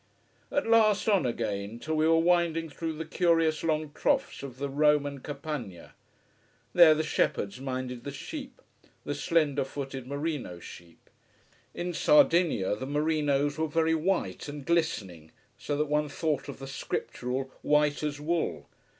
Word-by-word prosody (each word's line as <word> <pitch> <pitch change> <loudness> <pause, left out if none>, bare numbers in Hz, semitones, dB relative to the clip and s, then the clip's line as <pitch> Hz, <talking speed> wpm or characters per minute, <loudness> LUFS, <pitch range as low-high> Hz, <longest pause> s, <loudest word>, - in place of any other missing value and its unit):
At 285 - 0
last 220 -3 +4
on 195 - +3
again, 105 -2 -3
till 155 +6 -4
we 155 0 +2
were 165 0 +5
winding 165 -1 +2
through 165 +1 -4
the 160 +1 -5
curious 165 -3 +2
long 155 -2 0
troughs - - 0
of 135 -2 -8
the 140 +1 -2
Roman 145 0 +2
Campagna. 140 - -6 0.8
There 170 -3 +8
the 155 - 0
shepherds 115 -7 -1
minded 130 -2 -4
the - - -5
sheep: 265 - -8 0.4
the - - -3
slender 150 -4 +1
footed 135 -1 -6
merino 140 - -3
sheep. 85 0 -13 0.7
In 175 0 -3
Sardinia 170 - +4
the 130 +5 -6
merinos 145 -1 +1
were 160 - +1
very 160 +1 +1
white 170 +2 -1
and 145 -1 -7
glistening, 100 - -1 0.3
so 145 - -3
that 150 - +1
one 150 0 0
thought 145 -2 -2
of 140 - -7
the 135 - -8
Scriptural 135 -1 -4
"white 150 -1 +2
as 150 -1 -3
wool." 155 - -1
150 Hz, 150 wpm, -28 LUFS, 135-165 Hz, 0.8 s, There